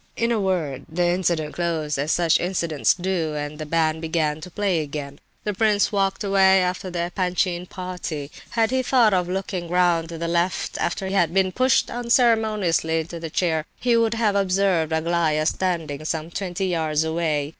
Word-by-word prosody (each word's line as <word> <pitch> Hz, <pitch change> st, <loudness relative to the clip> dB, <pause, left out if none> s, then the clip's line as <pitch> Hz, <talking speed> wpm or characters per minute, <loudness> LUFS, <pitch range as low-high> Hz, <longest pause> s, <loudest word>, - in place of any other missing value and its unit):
In 230 Hz, 0 st, 0 dB
a 230 Hz, -, +1 dB
word, 165 Hz, -9 st, -2 dB
the 175 Hz, +2 st, +1 dB
incident 170 Hz, -4 st, 0 dB
closed 160 Hz, -4 st, -2 dB
as 145 Hz, +3 st, 0 dB
such 170 Hz, -2 st, +3 dB
incidents 170 Hz, -4 st, +1 dB
do, 175 Hz, -4 st, -2 dB
and 145 Hz, +1 st, -5 dB
the 155 Hz, -, -5 dB
band 160 Hz, 0 st, +1 dB
began 160 Hz, -2 st, -1 dB
to 180 Hz, -, -8 dB
play 190 Hz, -1 st, 0 dB
again. 140 Hz, -1 st, -6 dB, 0.2 s
The 210 Hz, -, -2 dB
prince 210 Hz, 0 st, +2 dB
walked 195 Hz, 0 st, 0 dB
away 190 Hz, -1 st, +4 dB
after 180 Hz, +1 st, -2 dB
the 175 Hz, 0 st, -3 dB
Epanchin 180 Hz, -1 st, -1 dB
party. 180 Hz, -7 st, -6 dB, 0.2 s
Had 230 Hz, -1 st, +1 dB
he 260 Hz, 0 st, +2 dB
thought 245 Hz, -4 st, +3 dB
of 180 Hz, -1 st, +1 dB
looking 185 Hz, -2 st, -3 dB
round 175 Hz, -2 st, +2 dB
to 165 Hz, -, -6 dB
the 170 Hz, +1 st, -3 dB
left 170 Hz, +2 st, -1 dB
after 180 Hz, +3 st, -1 dB
he 190 Hz, -, -3 dB
had 175 Hz, -3 st, +2 dB
been 190 Hz, -1 st, +3 dB
pushed 255 Hz, +4 st, +2 dB
so -, -, -6 dB
unceremoniously 220 Hz, -9 st, +2 dB
into 170 Hz, +1 st, -8 dB
the 165 Hz, -1 st, -5 dB
chair, 160 Hz, -2 st, 0 dB
he 240 Hz, -1 st, +2 dB
would 230 Hz, 0 st, +2 dB
have 220 Hz, -3 st, +1 dB
observed 190 Hz, -4 st, +1 dB
Aglaya 160 Hz, -1 st, +1 dB
standing 160 Hz, -5 st, -1 dB
some 160 Hz, +1 st, -3 dB
twenty 190 Hz, 0 st, -3 dB
yards 160 Hz, -4 st, 0 dB
away. 160 Hz, -3 st, -1 dB
175 Hz, 185 wpm, -23 LUFS, 160-195 Hz, 0.2 s, away